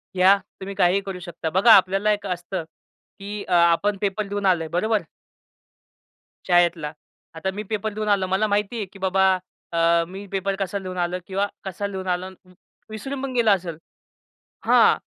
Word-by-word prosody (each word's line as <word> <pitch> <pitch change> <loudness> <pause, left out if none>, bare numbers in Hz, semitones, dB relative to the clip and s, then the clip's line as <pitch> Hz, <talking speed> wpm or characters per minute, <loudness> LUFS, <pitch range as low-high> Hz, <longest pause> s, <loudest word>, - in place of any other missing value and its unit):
घ्या 190 +2 +6 0.2
तुम्ही 195 +1 -6
काहीही 185 +1 +3
करू 190 -2 -5
शकता. 175 -2 -5
बघा 190 +7 +5
आपल्याला 195 +2 +4
एक 205 0 -5
असतं, 180 0 -4 0.6
की 205 +1 -6
अ, 185 - -1
आपण 175 +4 +3
पेपर 205 0 -1
देऊन 205 0 -3
आलोय. 175 -4 +2
बरोबर? 205 +6 0 1.5
शाळेतला. 175 -4 +2 0.4
आता 190 +4 -2
मी 210 +2 -5
पेपर 215 0 -2
देऊन 215 0 -3
आलो. 195 -2 +2
मला 190 +3 +1
माहिती 205 +3 0
आहे 210 - -2
की 195 - -13
बाबा, 190 0 +2 0.5
अ, 170 0 +3
मी 195 +2 -8
पेपर 195 0 -1
कसा 195 +1 -2
लिहून 185 -1 -7
आलो 175 +1 -1
किंवा 200 +1 0 0.2
कसा 195 +1 -4
लिहून 190 -1 -6
आलो 180 +1 -1 0.2
वि 185 - -20 0.4
विसरून 260 +6 -5
पण 265 -1 -3
गेलं 235 -3 +3
असेल 175 -5 -1 0.9
हां. - - +5
195 Hz, 170 wpm, -23 LUFS, 180-205 Hz, 1.5 s, घ्या